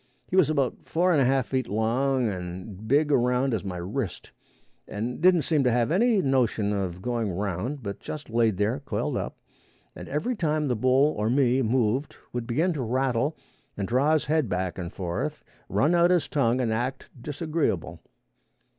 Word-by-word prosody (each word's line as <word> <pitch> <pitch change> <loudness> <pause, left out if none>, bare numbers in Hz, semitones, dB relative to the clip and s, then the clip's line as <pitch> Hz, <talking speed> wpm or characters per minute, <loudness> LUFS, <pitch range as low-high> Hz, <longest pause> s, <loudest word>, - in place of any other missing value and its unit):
He - - -3
was 185 -6 +5
about 140 -5 0
four 180 +3 +1
and 150 -5 +4
a - - +4
half 135 -1 +2
feet 130 -2 -1
long 120 +4 +1
and 95 +2 -6
big 145 +4 +3
around 125 0 +2
as 110 - -1
my 95 -3 -4
wrist, 95 +4 -4 0.6
and 120 +7 -4
didn't 180 -3 +5
seem 155 -4 +2
to 125 - +3
have 120 +3 +1
any 215 +2 +3
notion 120 -6 +1
of 95 -2 -3
going 120 -3 -1
around, 100 - -3
but 100 -1 -5
just 150 - -7
laid 115 -3 +1
there 105 +7 0
coiled 140 - -3
up, - - -4 0.6
and - - -9
every 150 - -1
time 155 -6 0
the 125 - +1
bull 130 +6 +3
or 105 +1 +1
me 130 0 +3
moved, 125 +3 0 0.2
would 120 -1 -3
begin 160 +9 +1
to 145 - -3
rattle 130 +4 0 0.4
and 100 -1 -2
draw 135 +7 +2
his 155 - +1
head 155 -6 +1
back 90 0 -2
and 85 -1 -5
forth, 90 -2 -4 0.3
run 155 +5 +2
out 175 0 +5
his 180 -3 +2
tongue 125 -3 +1
and 115 -3 0
act 125 +4 -3
disagreeable. 150 - -2
125 Hz, 180 wpm, -26 LUFS, 110-150 Hz, 0.6 s, was